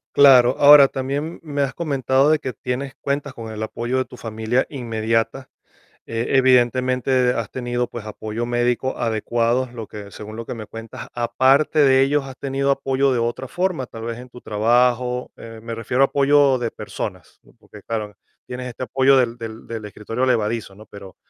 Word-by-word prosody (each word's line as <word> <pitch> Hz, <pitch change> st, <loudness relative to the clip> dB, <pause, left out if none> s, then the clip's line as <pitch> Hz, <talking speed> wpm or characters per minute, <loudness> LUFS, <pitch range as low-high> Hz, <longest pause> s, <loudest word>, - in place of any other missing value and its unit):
Claro. 130 Hz, -3 st, +7 dB
Ahora, 145 Hz, -1 st, +9 dB
también 140 Hz, +5 st, -4 dB
me 145 Hz, -3 st, -2 dB
has 135 Hz, -, -2 dB
comentado 135 Hz, -3 st, +1 dB
de 155 Hz, -, +4 dB
que 130 Hz, -4 st, -5 dB
tienes 130 Hz, +4 st, -4 dB
cuentas 140 Hz, -1 st, -2 dB
con 115 Hz, -2 st, -8 dB
el 110 Hz, 0 st, -5 dB
apoyo 120 Hz, +4 st, -3 dB
de 130 Hz, -, 0 dB
tu -, -, -13 dB
familia 110 Hz, +2 st, -1 dB
inmediata, 115 Hz, 0 st, -2 dB, 0.6 s
eh, 115 Hz, +1 st, -3 dB
evidentemente, 130 Hz, 0 st, +3 dB
has 115 Hz, -3 st, -4 dB
tenido, 120 Hz, -1 st, -2 dB
pues, 120 Hz, -3 st, -8 dB
apoyo 110 Hz, +2 st, -5 dB
médico 120 Hz, +2 st, -1 dB
adecuado, 120 Hz, +2 st, 0 dB
lo 115 Hz, -3 st, -7 dB
que 100 Hz, -1 st, -10 dB
según 105 Hz, +2 st, -9 dB
lo 115 Hz, +1 st, -6 dB
que -, -, -6 dB
me 110 Hz, -2 st, -8 dB
cuentas. 115 Hz, 0 st, -9 dB
Aparte 130 Hz, +6 st, +2 dB
de 135 Hz, -2 st, +5 dB
ellos, 140 Hz, +1 st, +1 dB
¿has 135 Hz, -1 st, -9 dB
tenido 140 Hz, 0 st, 0 dB
apoyo 135 Hz, 0 st, +1 dB
de 120 Hz, -, 0 dB
otra 120 Hz, +3 st, -2 dB
forma?, 175 Hz, -5 st, -2 dB
tal 115 Hz, -1 st, -10 dB
vez, 115 Hz, 0 st, -5 dB
en 125 Hz, -, -11 dB
tu 125 Hz, 0 st, -13 dB
trabajo, 125 Hz, +3 st, +1 dB
eh, 115 Hz, -1 st, -10 dB
me 115 Hz, 0 st, -6 dB
refiero 125 Hz, +3 st, 0 dB
a -, -, +7 dB
apoyo 140 Hz, -1 st, +3 dB
de 115 Hz, -2 st, -3 dB
personas, -, -, -7 dB
¿no?, -, -, -22 dB
porque, -, -, -15 dB
claro, 105 Hz, -2 st, -4 dB, 0.3 s
tienes 125 Hz, 0 st, -6 dB
este 125 Hz, +1 st, -7 dB
apoyo 135 Hz, +1 st, +3 dB
del 120 Hz, -2 st, +2 dB
del 115 Hz, -1 st, -8 dB
del 115 Hz, -2 st, -6 dB
escritorio 110 Hz, +4 st, -3 dB
elevadizo, 110 Hz, -4 st, 0 dB
¿no?, 105 Hz, +2 st, -14 dB
pero 100 Hz, -2 st, -12 dB
125 Hz, 185 wpm, -21 LUFS, 115-135 Hz, 0.6 s, Ahora